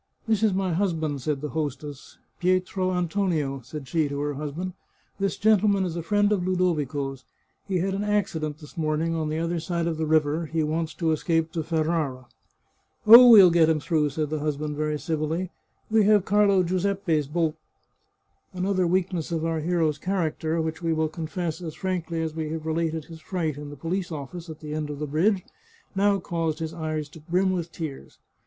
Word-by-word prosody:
" - - -40
This 220 -2 +2
is 220 -2 +4
my 190 -2 0
husband," 160 -6 -1
said 145 +1 -2
the 150 - -3
hostess. 145 -2 -5
— - - -44
" - - -43
Pietro 185 +1 +1
An 180 -1 0
tonio," 160 -8 -1
said 135 +2 -8
she 155 +2 +1
to 140 0 -3
her 145 0 -1
husband, 150 +6 -4 0.2
" - - -39
this 195 0 -1
gentleman 205 -2 +3
is 170 -2 -3
a 170 - -2
friend 205 +4 +2
of 195 -4 +1
Ludovico's. 145 -7 -1 0.4
He 190 - 0
had 190 +2 0
an 200 +1 -2
accident 165 -8 -1
this 150 -2 -14
morning 160 +1 0
on 160 -2 -1
the 155 - -2
other 170 +1 -1
side 170 0 -2
of 165 -2 -1
the 160 0 -1
river; 155 +1 +2
he 160 +1 0
wants 160 +1 -2
to 165 -2 0
escape 165 +1 0
to 165 - -2
Ferrara." 155 -5 -1 0.4
" - - -43
Oh, 235 +3 +11
we'll 200 -6 +9
get 165 -1 +5
him 160 -1 +2
through," 150 -1 +1
said 150 +1 -3
the 155 - -1
husband 150 0 -2
very 150 0 -1
civ 155 0 -2
illy. 165 +4 -2 0.2
" - - -32
We 220 -1 +5
have 205 -2 +4
Carlo 200 -2 +4
Giuseppe's 180 -4 0
boat." 160 0 0 1.0
Another 185 0 +1
weakness 180 -2 0
of 165 -1 -1
our 165 -1 0
hero's 160 -2 0
character, 165 -3 -1
which 160 +1 -3
we 165 -1 +1
will 160 0 0
confess 165 +1 -4
as 160 -3 -6
frankly 175 -3 -2
as 160 -1 -3
we 160 -1 -3
have 160 0 -5
related 160 -1 -1
his 165 -2 -11
fright 165 -6 -2
in 145 0 -8
the 145 - -8
police 175 +5 -3
office 160 +3 -7
at 155 - -9
the 150 -1 -6
end 155 -1 -3
of 145 - -5
the 150 - -3
bridge, 180 +7 +1 0.5
now 200 +1 +3
caused 165 -3 -2
his 160 -1 -4
eyes 155 -2 -3
to 160 - -13
brim 180 +5 +1
with 175 -2 -3
tears. 155 -5 -7
165 Hz, 210 wpm, -25 LUFS, 155-185 Hz, 1.0 s, Oh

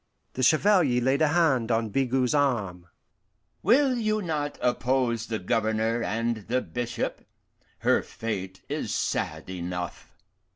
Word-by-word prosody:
The 130 - -4
Chevalier 155 -2 +4
laid 130 +4 +1
a 155 - +5
hand 145 -8 +2
on 115 -1 +1
Bigot's 130 +2 +1
arm. 105 -12 0 0.7
"Will 260 +2 +4
you 215 -2 0
not 155 -6 -3
oppose 125 -2 0
the 110 - -2
Governor 110 +2 0
and 115 +1 -1
the 125 +2 +1
bishop? 120 -1 -4 0.6
Her - - +3
fate 95 -4 -5
is - - -3
sad 80 +1 -2
enough." 90 -1 -6
120 Hz, 125 wpm, -27 LUFS, 110-145 Hz, 0.7 s, a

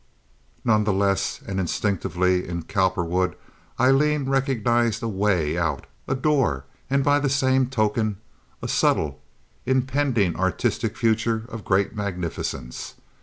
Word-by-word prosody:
None 110 -2 +4
the 105 -1 +1
less, 100 -1 0
and 95 -1 -3
instinctively 90 -1 0
in 85 -1 -4
Cowperwood 90 -2 0 0.4
Aileen 140 +3 +3
recognized 120 -4 +1
a - - 0
way 95 -6 +1
out—a 80 - -3
door—and 130 - 0
by 145 0 +4
the 145 -1 0
same 130 -1 +2
token 110 -3 0 0.5
a - - -2
subtle, - - +1 0.5
impending 130 - +1
artistic 95 0 -1
future 115 0 +1
of 115 -3 -7
great 100 +3 +1
magnificence. 85 - -4
105 Hz, 115 wpm, -24 LUFS, 95-130 Hz, 0.5 s, None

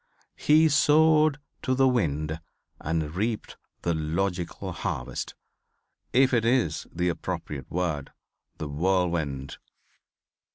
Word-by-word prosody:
He 155 +2 +5
sowed 155 0 +5 0.2
to 130 - 0
the 135 0 +4
wind 80 - 0 0.4
and 80 -1 -2
reaped 105 +4 -2 0.3
the 85 - +1
logical 85 +3 -2
harvest, - - -4 0.8
if 130 +1 +4
it 115 -2 +3
is 115 - +1
the 90 +1 -1
appropriate 75 -5 -4
word, 80 -5 -2 0.5
the 75 - -4
whirlwind. 80 -4 -1
90 Hz, 100 wpm, -27 LUFS, 80-130 Hz, 0.8 s, He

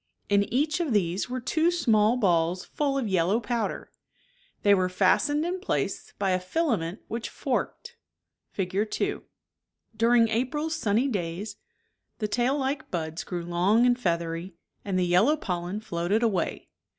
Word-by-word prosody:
In 200 0 +2
each 300 +7 +1
of 320 -8 0
these 190 +1 0
were 255 +1 -2
two 315 +7 +1
small 230 -9 +3
ballsfuU 185 - +1
of 245 - -2
yellow 190 +3 +2
powder; 235 0 -3 0.7
they 205 - +6
were 185 -2 +2
fastened 210 - +2
in 360 +2 -2
place 380 - -2
by 195 -2 +1
a 185 - +2
fila 280 - 0
ment 165 +5 -5
which 230 +1 -4
forked 475 +1 -3 0.5
(Fig. 195 +3 -1
2), - - -2 0.7
During 230 +1 +4
April's 275 +8 -1
sunny 235 -3 +1
days 190 -3 -3 0.6
the 215 - -1
tail 250 +6 +1
ke - - -20
buds 160 -2 -3
grew 175 -2 -5
long 185 +7 +3
and 245 0 +3
feathery, 170 -2 -2 0.3
and 195 -2 -1
the 180 - +2
yellow 195 - +4
pollen 180 - -3
floated 195 +2 -1
away. 195 -7 -1
210 Hz, 150 wpm, -27 LUFS, 180-255 Hz, 0.7 s, they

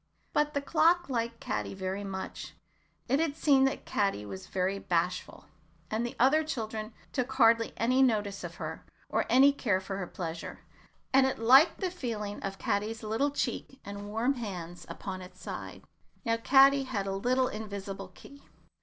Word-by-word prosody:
But 295 0 +1
the 280 - 0
clock 335 +3 +3
liked 235 -2 -2
Caddy - - -3
very 190 +1 -3
much. 190 -1 -6 0.5
It 270 +4 +2
had 320 -3 0
seen 275 -4 +4
that 270 - -1
Caddy 195 - 0
was 95 -2 -8
very 190 +1 -1
bashful, 180 0 -2 0.5
and 220 +2 0
that 240 - -1
the - - -11
other 305 +4 +5
children 220 -6 -4 0.2
took 255 -1 -1
hardly 230 -1 +4
any 255 +3 +3
notice 210 -6 +1
of - - -6
her, - - -6 0.3
or - - 0
any 275 +2 +6
care 210 -9 +1
for 195 0 -5
her 180 - -3
pleasure, 165 -2 -6 0.5
and 265 0 +6
it 265 - -2
liked 265 - +6
the 370 -2 0
feeling 215 - -4
of 195 0 -4
Caddy's 215 +3 -2
little 225 +7 +1
cheek 270 -1 -3
and 200 0 -7
warm 230 +6 +1
hands 180 -8 -6
upon 190 -2 -6
its 185 0 -12
side. - - -7 0.4
Now 230 0 +2
Caddy 270 +3 +5
had 215 -7 -2
a 195 - -2
little 255 +5 +2
invisible 200 -3 -6
key. 280 0 -15
225 Hz, 170 wpm, -30 LUFS, 195-270 Hz, 0.5 s, any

